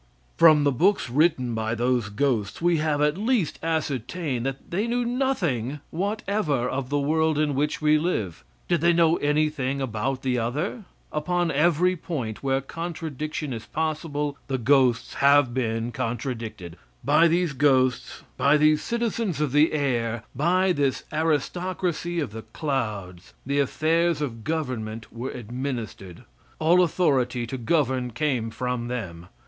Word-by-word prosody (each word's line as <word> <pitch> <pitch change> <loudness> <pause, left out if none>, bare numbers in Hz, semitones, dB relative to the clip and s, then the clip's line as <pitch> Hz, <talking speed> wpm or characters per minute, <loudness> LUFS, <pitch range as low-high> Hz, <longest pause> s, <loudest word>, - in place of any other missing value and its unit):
From 155 -3 +6
the 145 - +3
books 170 -1 +2
written 135 -4 +2
by 110 0 -1
those 120 -2 0
ghosts 105 -2 -1
we 170 0 +2
have 150 -1 +1
at 150 +5 +1
least 220 - 0
ascertained 150 -3 -2
that 135 0 -6
they 200 +6 0
knew 240 +1 0
nothing 175 - -1
whatever 195 - -1
of 130 0 -3
the 145 - +1
world 155 +2 +1
in 150 -1 +1
which 150 +3 -1
we 155 0 +4
live. 110 - -2 0.2
Did 170 -3 +1
they 170 +1 +4
know 165 0 +4
anything 145 -2 0
about 130 +2 -2
any 125 -1 +1
other? 150 - -3 0.3
Upon 175 +2 0
every 170 +5 +3
point 135 - -5
where 135 0 0
contradiction 155 -2 -5
is 115 -1 -7
possible, 150 -2 -2
the 135 - -1
ghosts 125 -1 +2
have 140 -2 +4
been 115 -2 -1
contradicted. 115 -7 -4 0.3
By 150 +5 +5
these 170 -2 +1
ghosts, 130 -2 +1
by 140 +2 +4
these 155 0 +4
citizens 230 - -2
of 150 -3 0
the 150 +3 +4
air, 120 -6 -1
by 180 +7 +2
this 140 -5 0
aristocracy 170 +2 -1
of 140 -9 -2
the 110 +1 -7
clouds 110 - -4
the 140 +2 0
affairs 160 +3 +1
of 120 -7 -4
government 115 -9 -4
were 120 +3 -4
administered 120 -6 -6 0.3
all 170 +3 +4
authority 135 -8 +1
to 130 +3 -5
govern 130 -2 +1
came 125 -3 -1
from 120 +1 -3
them. 90 -9 -5
145 Hz, 145 wpm, -25 LUFS, 125-165 Hz, 0.3 s, From